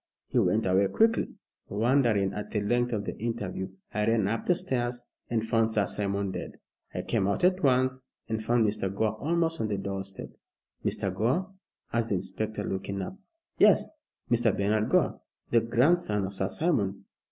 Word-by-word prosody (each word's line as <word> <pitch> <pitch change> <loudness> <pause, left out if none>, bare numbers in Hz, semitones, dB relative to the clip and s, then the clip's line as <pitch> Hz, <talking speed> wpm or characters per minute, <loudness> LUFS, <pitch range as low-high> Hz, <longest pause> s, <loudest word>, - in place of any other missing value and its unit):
He - - +2
went 110 +1 +2
away 95 +1 +3
quickly. 225 - +2 0.3
Wondering 110 -2 +2
at 105 - -5
the 105 - -1
length 120 +4 +1
of 105 -3 -2
the - - -4
interview, 100 -4 -3 0.2
I 105 0 0
ran 115 -3 +3
up 115 +2 -2
the 180 - +4
stairs 125 -8 -1 0.3
and 115 -2 0
found 115 -1 +2
Sir 105 -2 +2
Simon 100 0 -1
dead. - - -5 0.4
I - - -4
came 95 - 0
out 100 - 0
at 185 +1 +4
once, 130 -1 +2 0.2
and 110 0 -2
found 115 0 +3
Mr. 105 -2 -1
Gore 110 +2 0
almost 165 +4 0
on 110 - 0
the 105 -2 -1
doorstep 95 0 -5 0.3
" - - -44
"Mr. 95 -2 -1
Gore?" 130 - 0 0.4
asked 115 -1 +1
the 100 - +2
inspector, 105 +3 -3
looking 100 0 -3
up. 185 - -6 0.4
"Yes. - - +5 0.4
Mr. 120 -2 +4
Bernard 105 +2 +1
Gore, - - +2 0.3
the 115 - +5
grandson 115 - +2
of 95 - -5
Sir 95 -1 -1
Simon." 100 - 0
110 Hz, 175 wpm, -28 LUFS, 100-120 Hz, 0.4 s, Yes